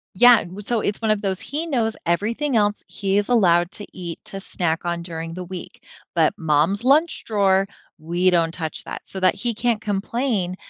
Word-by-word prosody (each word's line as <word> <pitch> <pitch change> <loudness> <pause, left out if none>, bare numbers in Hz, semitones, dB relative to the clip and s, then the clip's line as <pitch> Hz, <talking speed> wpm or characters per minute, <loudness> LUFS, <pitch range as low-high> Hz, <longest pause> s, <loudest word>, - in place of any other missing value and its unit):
Yeah, 245 +2 +7
well 185 +4 -8
so 225 +1 0
it's 205 - -2
one 220 - 0
of 215 -1 +2
those 195 -2 -1
he 295 +8 -4
knows 235 -7 0
everything 230 - 0
else 205 -1 +2
he 195 -1 -1
is 205 +2 0
allowed 175 -7 +4
to 205 - -6
eat 170 -2 -6
to 195 - -5
snack 175 -3 -2
on 170 0 -1
during 165 -1 -6
the 180 +1 -5
week, 180 0 -9 0.3
but 165 -1 +3
mom's 160 +5 +1
lunch 300 +6 +3
drawer, 195 -3 +2 0.3
we 175 +4 +1
don't 170 -2 +2
touch 160 -2 -4
that, - - -8
so 190 - -5
that 185 - +4
he 235 +4 -2
can't 230 -1 0
complain 205 -2 -1
195 Hz, 195 wpm, -22 LUFS, 175-225 Hz, 0.3 s, Yeah